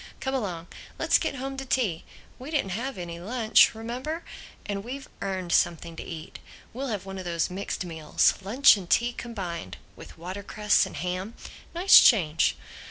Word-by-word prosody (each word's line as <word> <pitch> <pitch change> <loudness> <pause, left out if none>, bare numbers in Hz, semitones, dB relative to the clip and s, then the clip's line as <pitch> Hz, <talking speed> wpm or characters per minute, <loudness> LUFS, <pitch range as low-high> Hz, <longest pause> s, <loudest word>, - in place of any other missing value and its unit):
Come 265 -1 -3
along. 185 -10 -3 0.3
Let's - - +3
get - - -2
home 270 +1 -5
to 270 - -4
tea. 235 -10 -1 0.3
We 260 +4 -8
didn't 285 -12 -1
have 250 +7 -3
any 170 -1 -6
lunch, 220 +4 +4
remember. 255 +9 -5 0.4
And 200 -1 -3
we've 265 +4 -7
earned 185 -3 -3
something 170 0 +1
to - - -7
eat. 160 -3 -8 0.3
We'll 270 +4 -4
have 210 -6 -3
one 195 0 -6
of 185 - -7
those 170 0 -1
mixed 190 0 -4
meals, 160 -3 +2
lunch 235 +9 +6
and 180 -3 -9
tea 240 +1 +2
combined—with 195 -13 -8
watercress 200 +4 0
and - - -10
ham. 185 +5 -4 0.4
Nice 365 +3 +8
change. 165 - +4
200 Hz, 165 wpm, -27 LUFS, 175-255 Hz, 0.4 s, Nice